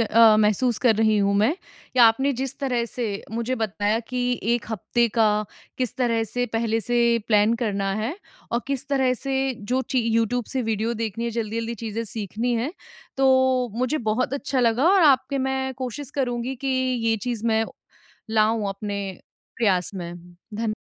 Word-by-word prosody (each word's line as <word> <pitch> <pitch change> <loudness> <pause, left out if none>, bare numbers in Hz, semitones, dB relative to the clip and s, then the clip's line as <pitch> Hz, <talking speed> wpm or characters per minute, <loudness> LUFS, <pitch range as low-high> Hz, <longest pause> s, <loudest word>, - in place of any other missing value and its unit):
अ, 225 -1 +6
महसूस 215 +3 +2
कर 240 -3 +4
रही 220 0 +3
हूँ 200 0 +2
मैं 220 +9 +3 0.4
कि 255 - -3
आपने 240 +5 +5
जिस 265 0 -4
तरह 250 -4 0
से 235 -3 -3
अ, - - -12
मुझे 235 +2 -1
बताया 215 -1 0
कि 250 -1 -1
एक 235 +1 0
हफ़्ते 235 +3 +1
का 225 0 +2 0.5
किस 255 -3 -2
तरह 235 -3 +1
से 245 +2 -2
पहले 225 0 0
से 240 +2 0 0.3
प्लान 210 +1 +4
करना 200 -3 -1
है 220 +8 -2 0.4
और 235 - +1
किस 275 0 -3
तरह 265 -2 +2
से 270 +1 -1
जो 250 +5 -1
ची 260 - +2
यूट्यूब 230 +1 +1
से 260 +3 -3
वीडियो 225 +1 -1
देखनी 225 0 -3
है, 235 - -1
जल्दी-जल्दी 230 +1 -3
चीज़ें 225 0 -4
सीखनी 225 +3 -2
हैं, 240 +7 -1 0.4
तो 260 -2 +3
मुझे 255 +6 0
बहुत 255 +4 0
अच्छा 275 -2 -1
लगा 235 +3 +2
और 390 -2 +5
आपके 280 -1 +4
मैं 265 0 -1
कोशिश 260 +2 -6
करूँगी 250 -1 -1
कि 275 +2 -6 0.4
ये 225 - +2
चीज़ 235 -3 -3
मैं 220 -1 +2 0.7
लाऊँ 220 -1 +2
अपने 200 +1 -4 0.6
प्रयास 190 -7 +2
में। 175 -2 -5 0.4
धन् 215 0 -1
235 Hz, 170 wpm, -24 LUFS, 220-255 Hz, 0.7 s, अ